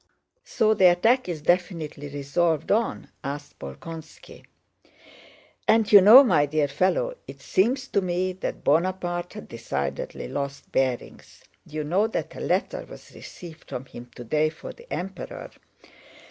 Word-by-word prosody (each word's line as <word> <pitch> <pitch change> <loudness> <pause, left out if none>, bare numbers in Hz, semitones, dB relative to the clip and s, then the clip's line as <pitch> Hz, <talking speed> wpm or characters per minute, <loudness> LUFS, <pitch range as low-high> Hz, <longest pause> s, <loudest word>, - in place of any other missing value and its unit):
"So 220 - +2
the 190 -3 +3
attack 225 +6 +2
is 155 -4 -5
definitely 165 -5 -1
resolved 150 +3 0
on?" 225 +3 0
asked 145 +1 -6
Bolkónski. 155 - -10 1.2
"And 225 0 +5
do 205 - +3
you 200 - +11
know, 225 +8 +10
my 145 - +3
dear 150 0 +1
fellow, 190 - 0
it - - -10
seems 255 +8 +1
to 200 - +1
me 185 0 -1
that 185 - -5
Bonaparte 175 +2 0
has 210 - -8
decidedly 70 -12 -4
lost 140 +1 -5
bearings, 130 -2 -3 0.2
you 155 0 -4
know 185 +8 +1
that 225 - -4
a - - -8
letter - - -1
was - - -13
received 165 -3 -12
from 130 - -5
him 120 -2 -11
today 150 +6 0
for - - -10
the 475 +1 -18
Emperor." 190 +1 -6
175 Hz, 145 wpm, -25 LUFS, 145-200 Hz, 1.2 s, you